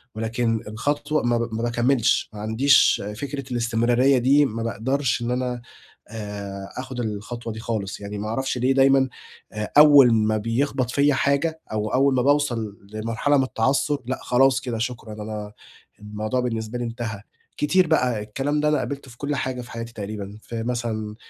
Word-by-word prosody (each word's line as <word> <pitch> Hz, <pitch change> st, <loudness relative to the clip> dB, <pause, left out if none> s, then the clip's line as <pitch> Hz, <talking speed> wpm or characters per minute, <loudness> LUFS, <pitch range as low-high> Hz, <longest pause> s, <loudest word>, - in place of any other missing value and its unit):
ولكن 115 Hz, +1 st, -1 dB
الخطوة 145 Hz, +7 st, -1 dB
ما 120 Hz, 0 st, +2 dB
ب 115 Hz, -1 st, -3 dB
ما 115 Hz, +1 st, -2 dB
باكمّلش، 120 Hz, 0 st, +2 dB
ما 105 Hz, -, -8 dB
عنديش 115 Hz, +6 st, +4 dB, 0.2 s
فكرة 140 Hz, -2 st, -5 dB
الإستمرارية 120 Hz, +3 st, +2 dB
دي، 140 Hz, +4 st, +4 dB
ما 115 Hz, -3 st, -3 dB
باقدرش 125 Hz, +3 st, -1 dB
إن 120 Hz, +1 st, -2 dB
أنا 125 Hz, -1 st, -2 dB, 0.5 s
آآ 100 Hz, -3 st, -7 dB
آخد 130 Hz, -1 st, -6 dB
الخطوة 115 Hz, +1 st, -4 dB
دي 110 Hz, -, -8 dB
خالص، 110 Hz, -4 st, -3 dB
يعني 105 Hz, 0 st, -6 dB
ما 105 Hz, +1 st, -4 dB
أعرفش 135 Hz, +3 st, -2 dB
ليه 125 Hz, +2 st, +2 dB
دايمًا 135 Hz, 0 st, +4 dB, 0.4 s
آآ، 105 Hz, -1 st, -5 dB
أول 145 Hz, -5 st, +8 dB
ما 110 Hz, -1 st, +2 dB
بيخبط 125 Hz, +3 st, -1 dB
فيّا 145 Hz, +2 st, +3 dB
حاجة 140 Hz, +5 st, 0 dB
أو 110 Hz, 0 st, -1 dB
أول 135 Hz, +1 st, +4 dB
ما 125 Hz, -, +2 dB
باوصل 120 Hz, -7 st, +1 dB, 0.2 s
لمرحلة 115 Hz, +6 st, 0 dB
من 135 Hz, -, +3 dB
التعثُّر، 135 Hz, +4 st, 0 dB
لأ 130 Hz, +2 st, -3 dB
خلاص 130 Hz, +1 st, +3 dB
كده 125 Hz, -3 st, -4 dB
شكرًا، 115 Hz, -1 st, -4 dB
أنا 105 Hz, -1 st, -6 dB, 0.5 s
الموضوع 105 Hz, +3 st, -3 dB
بالنسبه 115 Hz, -1 st, -3 dB
لي -, -, -2 dB
انتهى. 115 Hz, -3 st, -5 dB, 0.4 s
كتير 180 Hz, +4 st, +3 dB
بقى، 125 Hz, -8 st, +1 dB
الكلام 135 Hz, +8 st, -2 dB
ده 150 Hz, -, +1 dB
أنا 150 Hz, -, +2 dB
قابلته 140 Hz, -2 st, -5 dB
في 120 Hz, -, -16 dB
كلّ 145 Hz, +2 st, -2 dB
حاجة 130 Hz, -2 st, -3 dB
في 120 Hz, -, -12 dB
حياتي 115 Hz, 0 st, -6 dB
تقريبًا، 105 Hz, -1 st, -6 dB
في 115 Hz, -1 st, -5 dB
مثلًا 115 Hz, -3 st, -3 dB
120 Hz, 170 wpm, -23 LUFS, 110-135 Hz, 0.5 s, أول